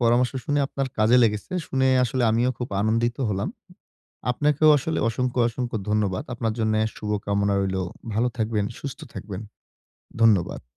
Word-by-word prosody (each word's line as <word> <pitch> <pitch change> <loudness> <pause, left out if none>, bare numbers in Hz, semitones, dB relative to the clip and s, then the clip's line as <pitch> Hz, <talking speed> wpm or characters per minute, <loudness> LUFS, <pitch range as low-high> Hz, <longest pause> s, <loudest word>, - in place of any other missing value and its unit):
পরামর্শ 120 +1 +3
শুনে 145 0 +1
আপনার 135 -1 -3
কাজে 110 +3 +5
লেগেছে। 105 - 0
শুনে 130 0 +1 0.2
আসলে 125 +1 -1
আমিও 120 +3 +2
খুব 125 - -4
আনন্দিত 115 +3 +1
হলাম। 100 0 -1 0.8
আপনাকেও 150 +4 +3
আসলে 160 +4 -2
অসংখ্য, 125 +2 -1
অসংখ্য 120 0 -3
ধন্যবাদ। 105 +3 0
আপনার 115 -2 -1
জন্যে 110 0 +1 0.2
শুভ 105 - -5 0.2
কামনা 100 0 +1
রইলো। 95 -1 -1 0.3
ভালো 115 +3 +2
থাকবেন, 110 -2 0 0.2
সুস্থ 140 +1 -6
থাকবেন। 100 -2 -6 0.8
ধন্যবাদ। 105 -6 +3
115 Hz, 145 wpm, -24 LUFS, 105-125 Hz, 0.8 s, কাজে